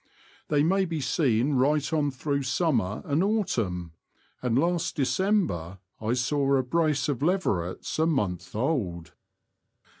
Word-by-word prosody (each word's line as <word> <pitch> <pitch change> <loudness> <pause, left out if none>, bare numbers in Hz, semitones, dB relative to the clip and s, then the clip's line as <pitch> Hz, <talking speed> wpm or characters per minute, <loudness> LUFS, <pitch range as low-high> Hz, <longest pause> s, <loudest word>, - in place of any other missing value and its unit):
They 145 -1 +2
may 190 +4 +2
be 165 -3 -3
seen 135 -2 +1
right 145 +4 +2
on 150 -2 +2
through 140 +1 -2
summer 125 - 0
and 150 +4 +1
autumn, 115 - -1 0.5
and 125 -1 +1
last 170 +3 0
December 135 - 0 0.2
I 110 +2 0
saw 140 +2 +1
a 130 - +2
brace 155 +2 +1
of 140 -4 -2
leverets 145 - -1
a 160 - +3
month 95 - -1
old. 95 - -2
140 Hz, 130 wpm, -27 LUFS, 110-160 Hz, 0.5 s, a